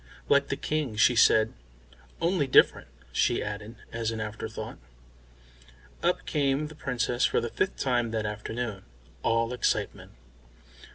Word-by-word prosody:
"Like 140 0 +4
the - - -1
King," 150 -7 -2
she 120 +3 +4
said. 110 -1 +5 0.7
"Only 170 -4 +1
different," 130 - +5 0.2
she - - +1
added, 105 +2 -6 0.2
as 115 -1 -2
an 115 -1 -4
afterthought. 110 0 -6 1.2
Up - - +1
came 145 0 0
the - - -10
Princess 125 -3 -1
for - - +3
the 120 - -3
fifth 190 - -1
time 120 -3 +1
that 110 -1 -2
afternoon, 105 0 -4 0.4
all 115 +1 +1
excitement. 125 - -1
120 Hz, 130 wpm, -28 LUFS, 110-140 Hz, 1.2 s, said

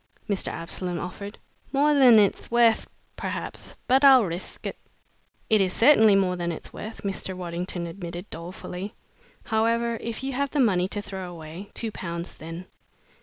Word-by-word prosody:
Mr. 200 -3 -1
Absolom 175 +1 -4
offered. 200 +4 -6 0.3
"More 295 +2 +4
than 255 -5 +7
it'th 205 -2 +2
worth, 235 -1 +4 0.3
perhaps, - - -5
but 265 +2 +4
I'll 265 -3 +8
rithk 175 -1 -6
it." - - -4 0.7
"It 215 -3 +4
is 185 -1 +1
certainly 220 -5 +6
more 185 -2 +2
than 175 -1 -2
it's 160 - -7
worth," 220 +1 -8
Mr. 190 -1 -3
Waddington 175 0 -4
admitted, 175 +1 -7
dolefully. 180 +3 -7 0.5
"However, 230 +1 +1
if 230 +2 -5
you 270 0 -2
have 280 +2 0
the 295 - -1
money 185 -8 +3
to 205 +1 -3
throw 190 -3 -6
away 170 +3 -9
two 225 -2 -3
pounds, 170 -3 -5
then." 165 +3 -8
195 Hz, 160 wpm, -26 LUFS, 175-230 Hz, 0.7 s, I'll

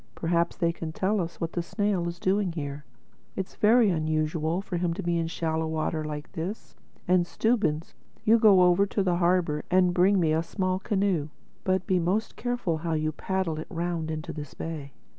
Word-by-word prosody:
Perhaps 170 0 0
they 170 -1 +1
can 165 -1 -5
tell 195 +5 0
us 170 0 -6
what 165 0 -3
the 175 - -1
snail 195 0 -1
is 170 0 -4
doing 190 0 +1
here—It's 145 +5 -8
very 220 -1 +4
unusual 155 +1 0
for 195 -2 -4
him 170 -1 0
to - - -5
be 170 -1 +1
in 165 - -1
shallow 160 -1 -1
water 160 0 -1
like 150 -1 -6
this. 180 +7 -6 0.3
And 180 -1 +3
Stubbins, 205 -10 0 0.3
you 225 +2 +5
go 200 -5 +7
over 180 +3 +4
to 200 - 0
the 180 -2 +1
harbor 170 -4 +1
and 180 -1 +4
bring 185 +3 +4
me 160 -3 +2
a 160 - +2
small 185 +2 -1
canoe. 190 -6 0 0.3
But 185 -1 +1
be 185 -1 +2
most 190 +6 -1
careful 245 -9 -1
how 165 0 -2
you 155 0 0
paddle 180 -1 -2
it 155 - -6
round 170 -2 -2
into 155 +2 -4
this 150 -2 -8
bay. 150 -4 -6
170 Hz, 190 wpm, -27 LUFS, 160-190 Hz, 0.3 s, go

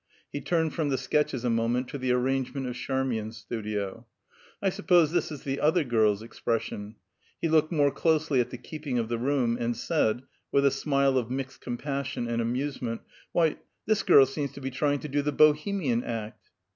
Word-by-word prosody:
He 145 - -3
turned 160 +2 0
from 155 -3 0
the 135 - +1
sketches 130 -1 0
a 120 - +2
moment 115 +2 +1
to 140 - -5
the 130 -1 0
arrangement 130 +2 0
of 125 - -3
Charmian's 125 -4 -2
studio. 105 0 -4 0.5
"I 195 - +1
suppose 175 -5 +3
this 175 -1 0
is 145 - -7
the 135 0 -2
other 160 +3 +3
girl's 110 -4 +2
expression." 110 -2 -3 0.4
He - - 0
looked 155 0 +3
more 145 -4 +3
closely 155 -5 +2
at 120 - -3
the 125 - -7
keeping 145 0 -5
of 115 -1 -1
the 120 -1 -1
room, 125 -2 +1
and 120 -1 -1
said, 125 -5 +1 0.3
with 140 0 +3
a 140 - +5
smile 140 -1 +2
of 120 -2 -5
mixed 135 +1 -4
compassion 135 0 -3
and 115 0 0
amusement, 125 -1 -2 0.3
"Why, 165 -3 +2 0.3
this 215 -1 +2
girl 140 -8 +7
seems 140 +1 -4
to - - -9
be 135 0 -4
trying 145 +2 0
to - - -5
do 145 0 0
the 150 +1 -1
Bohemian 150 -3 +3
act!" 110 -2 -6
135 Hz, 190 wpm, -28 LUFS, 120-150 Hz, 0.5 s, girl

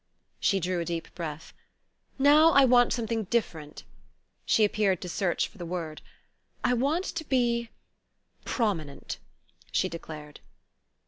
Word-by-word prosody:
She 195 - +2
drew 180 0 -1
a 170 - -2
deep 170 -1 -4
breath. 160 -3 -6 0.6
"Now 300 +4 +6
I 275 -1 +7
want 245 -1 +5
something 225 -2 -1
different." 165 -9 -2 0.6
She 215 - +5
appeared 200 -3 +1
to 180 - -5
search 175 +1 0
for 210 - -19
the - - -5
word. 165 -3 -5 0.6
"I 250 - +3
want 285 +9 +1
to 335 -4 -4
be 235 -4 +1 0.7
prominent," 165 - -2 0.5
she - - +1
declared. 155 -3 -9
205 Hz, 130 wpm, -28 LUFS, 170-245 Hz, 0.7 s, I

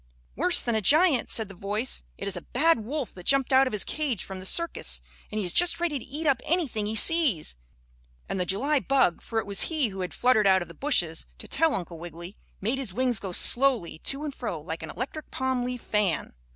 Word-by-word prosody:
"Worse - - +3
than 235 - -1
a 220 - 0
giant," 300 - +4
said 220 -2 +4
the 195 - -12
voice. 205 +6 0 0.2
"It 200 - -6
is 195 - -2
a 175 - -6
bad 320 - +1
wolf 275 +2 -5
that 180 -1 -13
jumped 275 -1 +3
out 265 +1 +5
of - - -3
his 210 - +1
cage 280 -10 -3
from 190 -1 -8
the 185 - -3
circus, 335 - 0 0.3
and 215 - -5
he 210 - -1
is 175 - 0
just 350 0 +3
ready 330 -5 -1
to - - -11
eat 300 +5 -1
up 270 -4 +2
anything 285 - 0
he 220 - -2
sees," 250 - +4 0.7
and 195 - -4
the - - +1
July 275 - +1
bug, 265 -11 +1
for 225 - -6
it 225 - 0
was 200 -1 0
he 305 -8 +1
who 195 -1 -9
had 180 - -5
fluttered 230 -5 +3
out 190 -1 +4
of 175 - -15
the - - -11
bushes, 175 - 0
to - - -9
tell 320 -2 +1
Uncle 170 -3 -6
Wiggily, 175 +3 -10 0.3
made 230 +7 -1
his 230 -9 -4
wings 250 -3 +1
go 195 -2 -6
slowly 240 - +3
to 275 - -1
and 295 -2 -4
fro 215 -11 -5
like 160 +2 -7
an 160 - -8
electric 275 - -7
palm 260 -1 -2
leaf 250 -1 -5
fan. 205 -7 -1
230 Hz, 235 wpm, -26 LUFS, 190-275 Hz, 0.7 s, out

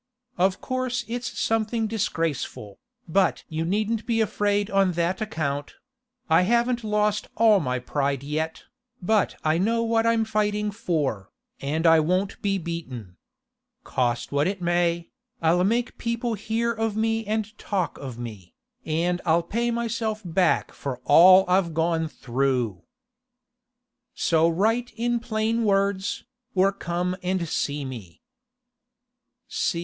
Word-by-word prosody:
Of 185 +2 +1
course 255 -1 -2
it's 240 +1 -4
something 225 0 0
disgraceful, 165 - -3 0.3
but 190 +3 +2
you 160 0 -2
needn't 215 +5 -1
be 230 -2 +1
afraid 205 -1 +1
on 195 -2 +3
that 175 +3 -1
account; 145 -9 -3 0.5
I 160 +1 +5
haven't 235 +4 +1
lost 210 -1 0
all 220 -3 +6
my 125 -6 -1
pride 140 +1 -1
yet, 155 +3 -3 0.4
but 205 +2 +1
I 155 +1 +2
know 230 +4 +1
what 230 0 +2
I'm 230 -1 +2
fighting 210 -1 0
for, 150 - -2 0.3
and 155 +4 -2
I 165 -1 +7
won't 185 +5 0
be 200 -1 +1
beaten. 130 - -6 0.7
Cost 120 -1 -1
what 145 +1 +2
it 195 0 -2
may, 175 -1 0 0.3
I'll 170 +2 +3
make 235 +5 0
people 235 0 -1
hear 225 +2 -1
of 225 -1 -2
me 225 0 +1
and 215 0 -2
talk 190 -4 -2
of 130 -4 -7
me, 110 -7 -9 0.3
and 175 +3 0
I'll 170 +1 +3
pay 235 +7 -1
myself 230 -2 -2
back 180 +2 +1
for 135 -3 -5
all 185 +5 +8
I've 180 -3 +2
gone 165 0 +1
through. 125 - -1 1.3
So 165 0 +3
write 225 +8 0
in 240 +1 0
plain 230 0 -1
words, 200 -1 +1 0.3
or 190 +1 +4
come 180 -1 -2
and 185 -1 -1
see 145 -1 -2
me. 110 -10 -9
185 Hz, 135 wpm, -25 LUFS, 160-220 Hz, 1.3 s, all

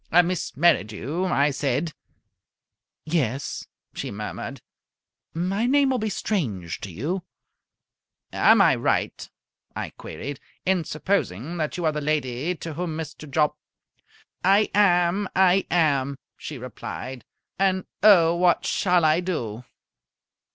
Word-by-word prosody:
"Miss 175 -7 -3
Merridew?" 150 - +1
I 145 -4 +2
said. 140 +3 -1 1.1
"Yes," 140 -5 -2 0.3
she - - -4
murmured. - - -6 0.8
"My 195 +7 0
name 275 0 +4
will 255 - +1
be 215 0 -1
strange 110 - -2
to 100 - -6
you." 150 - -3 1.1
"Am - - +6
I - - +5
right," - - -1 0.5
I - - -4
queried, 135 - -7 0.3
"in 185 -3 +2
supposing 155 - -2
that 155 +1 -2
you 175 - -2
are 155 - +3
the 150 0 -3
lady 150 +2 -1
to 165 -1 -7
whom 165 0 -3
Mr. 155 -1 -7
Jopp 150 +1 +2 0.5
" - - -32
"I 215 - +1
am! 185 -1 +3
I 190 0 +4
am!" 140 -5 +2 0.2
she 150 - -7
replied. 125 +1 -7 0.4
"And, 190 -1 +2 0.2
oh, 175 -5 +6
what 175 0 +3
shall 180 -3 +2
I 155 +2 +4
do?" 125 - -3
160 Hz, 125 wpm, -24 LUFS, 140-180 Hz, 1.1 s, Am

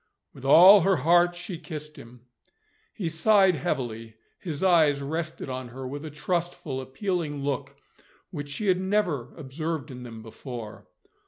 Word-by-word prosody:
With 135 - -12
all 185 +8 +9
her 195 +3 +3
heart 175 +2 +3
she 175 -1 -7
kissed 155 -2 -8
him. 120 +1 -14 0.7
He 185 - -4
sighed 190 +4 +4
heavily; 115 -6 -4 0.2
his 160 -2 -5
eyes 160 -6 +4
rested 155 +3 -4
on 130 -1 -5
her 130 +2 -8
with 145 +3 -6
a 155 - -6
trustful 155 -3 -3
appealing 145 +1 -3
look 140 0 -3 0.6
which 145 -4 -6
she 175 +9 -4
had 185 -2 +2
never 185 - 0
observed 155 0 -5
in 125 -1 -9
them 115 -2 -9
before. 115 -1 -9
150 Hz, 150 wpm, -26 LUFS, 130-175 Hz, 0.7 s, all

